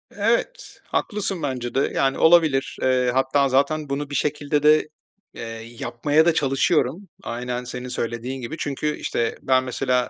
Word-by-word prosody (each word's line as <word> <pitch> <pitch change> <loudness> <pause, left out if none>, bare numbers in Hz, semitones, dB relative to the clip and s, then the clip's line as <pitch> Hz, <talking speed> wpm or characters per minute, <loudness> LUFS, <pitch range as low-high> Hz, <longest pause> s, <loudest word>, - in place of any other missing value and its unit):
Evet, 235 - -1
haklısın 195 -6 -2
bence 125 -3 -3
de, 135 - +1
yani, 135 0 +1
olabilir. 160 -5 +4
Iıı, 125 -1 +2
hatta 135 +2 +2
zaten 140 +3 +1
bunu 140 +1 -3
bir 145 - -5
şekilde 145 +1 0
de, 155 0 +5 0.5
eee, - - -9 0.4
yapmaya 145 +6 +1
da 170 - +4
çalışıyorum. 150 +4 +1 0.2
Aynen 125 +1 -4
senin 125 0 -6
söylediğin 120 +2 -4
gibi. 125 +7 -5
Çünkü, 150 +1 -2
işte, 115 -1 -2
ben 130 -1 +2
mesela, 125 0 0
140 Hz, 150 wpm, -23 LUFS, 125-155 Hz, 0.5 s, de